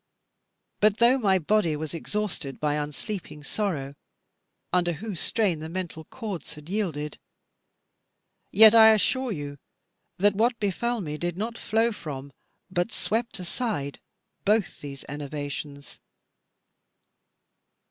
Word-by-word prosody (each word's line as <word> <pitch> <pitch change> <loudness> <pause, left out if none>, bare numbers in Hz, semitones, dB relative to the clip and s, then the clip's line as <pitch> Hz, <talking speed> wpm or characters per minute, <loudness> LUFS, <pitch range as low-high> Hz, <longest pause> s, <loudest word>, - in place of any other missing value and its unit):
But 210 0 +4
though 245 +3 +5
my 195 -5 +4
body 185 -2 +2
was 155 +1 -4
exhausted 175 -5 -3
by 150 -1 +1
unsleeping 150 +2 -4
sorrow, 145 -6 -2 0.8
under 175 -1 +3
whose 200 +1 -5
strain 200 -8 +1
the 160 +1 -6
mental 170 -3 -5
chords 200 -9 -6
had 150 +2 -12
yielded, 160 -8 -2 1.3
yet 220 +2 +8
I 220 -1 +9
assure 260 +4 +1
you 145 -5 -5 0.6
that 205 +2 +4
what 230 +3 +2
befell 225 +4 0
me 150 -3 -4
did 175 0 -2
not 225 +3 -3
flow 225 +1 +1
from 140 -8 -7 0.4
but 175 +4 0
swept 225 +5 0
aside 180 - -3 0.4
both 210 0 +1
these 140 -2 -8
enervations. 145 0 -6
180 Hz, 115 wpm, -27 LUFS, 150-215 Hz, 1.3 s, I